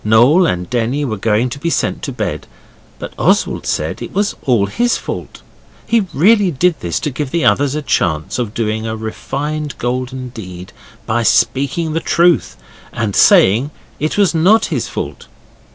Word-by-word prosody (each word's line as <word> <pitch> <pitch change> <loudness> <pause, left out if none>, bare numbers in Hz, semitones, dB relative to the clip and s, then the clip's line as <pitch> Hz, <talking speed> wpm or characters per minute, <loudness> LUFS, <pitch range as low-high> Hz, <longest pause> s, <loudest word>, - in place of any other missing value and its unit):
Noel 125 +12 +5
and 90 - -2
Denny 125 +4 -1
were 115 -5 -2
going 110 +4 +1
to 140 - -6
be 170 - -1
sent - - -1
to 140 - -4
bed, 110 -5 -4 0.5
but - - -8
Oswald - - +1
said - - -2
it - - -6
was 205 +2 0
all 120 -7 +2
his 240 - 0
fault. - - -7 0.4
He 225 -4 +1
really 205 +5 +4
did 170 +2 +1
this 85 -1 -2
to 150 - -2
give 140 +1 -4
the 170 +3 0
others 145 0 +2
a 150 - -3
chance 90 - -1
of 115 -3 -3
doing 110 0 -2
a 110 - -3
refined 145 +7 -4
golden 125 +1 -3
deed 90 -6 -9 0.3
by 115 +2 0
speaking 135 +8 +1
the 165 - 0
truth 170 - +2 0.3
and 110 -4 -2
saying 115 +9 +5 0.3
it 155 +5 -2
was 200 -4 +3
not 190 +7 +4
his - - -1
fault. - - -6
130 Hz, 170 wpm, -16 LUFS, 110-160 Hz, 0.5 s, Noel